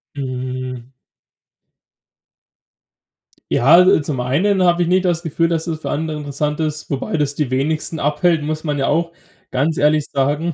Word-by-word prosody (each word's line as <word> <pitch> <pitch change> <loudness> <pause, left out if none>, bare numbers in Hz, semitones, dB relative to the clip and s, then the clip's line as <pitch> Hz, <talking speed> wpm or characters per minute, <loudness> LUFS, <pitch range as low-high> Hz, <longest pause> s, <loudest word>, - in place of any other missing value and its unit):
Hm. 130 -2 -5 2.6
Ja, 120 - +1
al 180 0 +6
zum 145 -3 -3
einen 185 +10 +1
habe 175 0 +3
ich 175 - +1
nicht 185 +1 +2
das 175 -2 0
Gefühl, 165 +1 0
dass 165 0 -1
es 160 -2 -4
für - - -4
andere 155 +1 -2
interessant 150 +1 -3
ist, 155 -1 -3
wobei 140 +3 -2
das 145 -1 -1
die 145 -4 -2
wenigsten 155 +4 -1
abhält, 150 +2 +1
muss 155 +1 -3
man 150 -3 -2
ja 135 - +1
auch 165 +2 0 0.4
ganz 145 +5 0
ehrlich 150 0 +2
sagen. 145 +4 -1
150 Hz, 160 wpm, -19 LUFS, 140-165 Hz, 2.6 s, al